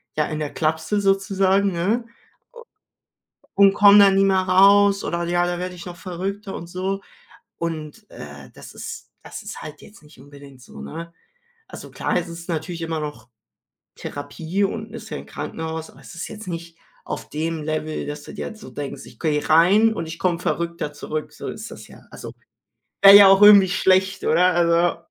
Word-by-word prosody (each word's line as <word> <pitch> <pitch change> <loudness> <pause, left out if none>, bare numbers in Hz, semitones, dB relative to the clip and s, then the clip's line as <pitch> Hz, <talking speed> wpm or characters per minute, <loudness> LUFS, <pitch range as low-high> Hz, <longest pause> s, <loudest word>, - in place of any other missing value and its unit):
ja, 150 -1 +1
in 155 0 -5
der 150 -2 -4
Klapse 160 +6 -1
sozusagen, 195 0 +1
ne? 210 +8 -1 1.5
U 200 - +4
und 195 -1 +7
komme 205 0 +7
da 200 -1 +7
nie 195 0 +3
mehr 190 -1 +3
raus.“ 200 +2 +4
Oder: 170 0 -2
„Ja, 175 +1 0
da 175 0 -3
werde 180 0 -5
ich 170 - -11
noch 175 -1 -8
verrückter.“, 195 +2 -6
und 170 - -7
so. 190 +3 -4 0.6
Und, 160 -3 -6
äh, 70 -2 -11
das - - -12
ist - - -9
das - - -9
ist - - -8
halt 150 0 -10
jetzt 205 -5 -16
nicht 150 -3 -19
unbedingt 140 -2 -15
so, 70 - -13
ne? 165 - -8 0.6
Also, - - -10
klar, - - -2
es 175 -1 -1
ist 170 +1 -10
natürlich 165 +1 -4
immer 160 -1 -3
noch 145 -6 -7 0.7
Therapie 160 +7 -4
und 215 +2 -4
ist 220 -1 -9
ja - - -4
'n - - -10
Krankenhaus, 160 0 -6
aber - - -19
es - - -13
ist 165 - -6
jetzt 215 -2 -10
nicht 170 -1 -7 0.3
auf - - -7
dem 160 +1 -3
Level, 155 0 -3
dass 150 0 -7
du - - -10
dir - - -5
jetzt 220 -1 -12
so - - -11
denkst: 145 -1 -7
„Ich - - -16
gehe 150 -3 -1
rein 200 +8 +5
und 165 - -4
ich 160 +1 -8
komme 175 -2 0
verrückter 170 -3 -3
zurück.“ 150 +1 -6
So - - -8
ist - - -7
das - - -12
ja. - - -16
Also, - - -9 0.7
wäre 200 0 +10
ja 200 -1 +10
auch 195 +1 +5
irgendwie 200 -3 +8
schlecht, 190 +1 +1
oder? 180 +3 +3
Also 170 0 +2
175 Hz, 195 wpm, -22 LUFS, 155-195 Hz, 1.5 s, wäre